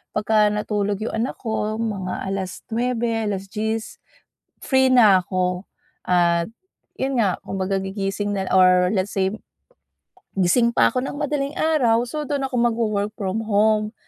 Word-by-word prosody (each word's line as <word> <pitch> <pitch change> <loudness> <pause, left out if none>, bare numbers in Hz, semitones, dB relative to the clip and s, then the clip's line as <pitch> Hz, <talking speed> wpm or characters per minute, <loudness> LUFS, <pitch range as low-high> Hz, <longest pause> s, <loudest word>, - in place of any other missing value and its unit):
pagka 210 0 +3
natulog 205 -1 -1
'yong 225 - -4
anak 250 - -3
ko, 220 -2 -2
mga 200 -5 -3
9:00, 225 +4 -2
10:00, 215 +3 -4 0.6
free 265 -1 +2
na 205 -7 +6
ako. 180 +1 -1 0.4
At 170 +1 +2 0.5
'yon 265 0 -1
nga, 205 -6 +1
kumbaga 195 0 -2
gigising 195 +1 -3
na 190 - -2
-or 185 +1 +5
let's 190 0 0
say 190 +1 +1 1.0
gising 235 +6 +2
pa - - +4
ako 255 +1 -2
ng - - -5
madaling 285 -1 -1
araw, 255 -9 +2
so 300 +3 -4
dun 285 0 -2
ako 265 -2 -2
magwo-work 220 -3 0
from 215 +1 -3
home 215 +1 +2
215 Hz, 135 wpm, -22 LUFS, 195-235 Hz, 1.0 s, na